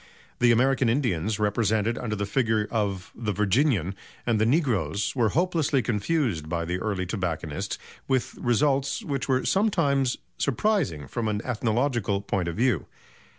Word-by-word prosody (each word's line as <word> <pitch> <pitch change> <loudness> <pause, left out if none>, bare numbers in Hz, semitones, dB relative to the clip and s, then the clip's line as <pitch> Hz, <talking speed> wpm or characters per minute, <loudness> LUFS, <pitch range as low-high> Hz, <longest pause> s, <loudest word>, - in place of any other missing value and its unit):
The 120 -1 +5
American 130 +1 +3
Indians, 110 - 0
represented 110 +1 +1
under 110 -2 -3
the 100 0 -2
figure 110 -1 +1
of 100 -5 -2
"The 110 -3 -3
Virginian," 105 - +2 0.3
and 115 -3 +1
the 110 - +3
negroes 120 - +1
were 120 -4 +3
hopelessly 155 - +1
confused 105 - 0
by 85 0 -1
the 90 +2 -2
early 95 -3 -2
tobacconists, 85 -6 -3 0.3
with 130 -2 0
results 135 - +1
which 140 -8 -2
were 130 0 +2
sometimes 155 - +2 0.2
surprising 160 - 0
from 115 - -2
an 105 -1 0
ethnological 120 -3 0
point 95 -3 -1
of 85 - -3
view. 120 - +1
115 Hz, 145 wpm, -26 LUFS, 100-135 Hz, 0.3 s, The